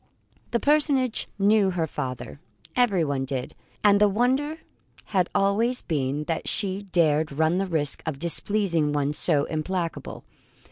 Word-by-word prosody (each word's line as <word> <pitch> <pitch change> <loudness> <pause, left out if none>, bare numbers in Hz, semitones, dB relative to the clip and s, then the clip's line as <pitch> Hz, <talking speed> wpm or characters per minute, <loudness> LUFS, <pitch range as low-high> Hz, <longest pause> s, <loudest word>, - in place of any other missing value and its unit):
The 235 - 0
personage 285 -4 +2
knew 205 0 +3
her 175 -3 -1
father 135 -2 -6 0.4
everyone 170 - +1
did 130 -2 -4 0.3
and 205 -1 +5
the 210 - +6
wonder 260 +9 0 0.5
had 185 -4 0
always 225 +6 +1
been 145 -1 -1
that 165 +1 -3
she 200 -2 -2
dared 155 -3 +2
run 160 +5 +1
the 195 - -1
risk 155 -5 0
of 155 -4 -2
displeasing 170 -1 +1
one 145 0 0
so 150 -2 +3
implacable. 165 +3 -4
180 Hz, 135 wpm, -25 LUFS, 150-210 Hz, 0.5 s, the